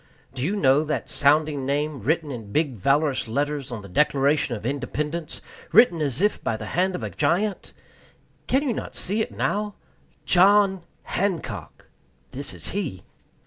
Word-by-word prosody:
Do 130 - -6
you 180 +10 0
know 140 -5 +4
that 155 0 -3
sounding 145 0 +2
name, 145 +1 -1
written 155 - 0
in 115 -5 -7
big 150 0 +1
valorous 135 +5 +1
letters 140 +2 -2
on 110 -4 -6
the - - -9
Declaration 140 +3 +2
of 105 0 -8
Independence 150 +4 -3 0.3
written 200 -8 +5
as 140 0 0
if 210 - +1
by 110 - -1
the 110 - -7
hand 185 +1 +1
of - - -5
a - - -4
giant? 200 +4 0 0.8
Can 270 +3 +2
you 265 -5 0
not - - -6
see 210 +4 0
it - - -3
now? 210 0 -2 0.5
JOHN 195 +1 +5 0.2
HANCOCK. 190 -4 -3 0.5
This 140 +2 -3
is - - -3
he. 180 - -4
150 Hz, 160 wpm, -24 LUFS, 135-185 Hz, 0.8 s, written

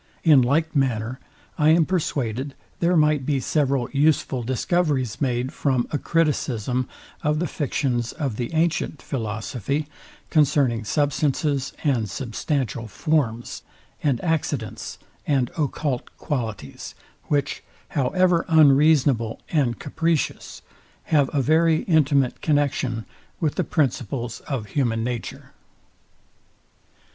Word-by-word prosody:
In 150 -5 +7
like 155 +6 +1
manner, 125 -2 0 0.4
I 150 0 +5
am 160 0 +5
persuaded, 140 - -2 0.2
there 175 +1 +3
might 150 -2 +3
be 140 0 0
several 135 -2 +1
useful 140 -3 +2
discoveries 130 0 0
made 125 -1 0
from 130 -4 0
a 145 - 0
criticism 130 -6 0 0.3
of 150 -2 +1
the 175 - 0
fictions 130 -6 -1
of 135 -8 -3
the 120 -1 -3
antient 160 -2 0
philosophy, 120 +4 -3 0.4
concerning 135 -7 +3
substances, 145 +1 0
and 125 -8 +1
substantial 125 - -2
form, 120 -3 0 0.6
and 135 -5 +1
accidents, 145 - -2 0.3
and 135 -4 +1
occult 145 -4 -2
qualities; 110 - -4 0.3
which, 140 -2 -1 0.3
however 170 +5 +2
unreasonable 145 -6 +4
and 130 -8 +1
capricious, 165 +1 -2 0.5
have 145 -3 +4
a 140 -2 +1
very 160 +2 +3
intimate 140 -6 +2
connexion 135 -6 0 0.3
with 155 -4 0
the - - 0
principles 125 - -1
of 130 -7 -2
human 115 -5 0
nature. 120 -1 -5
140 Hz, 110 wpm, -23 LUFS, 120-155 Hz, 0.6 s, In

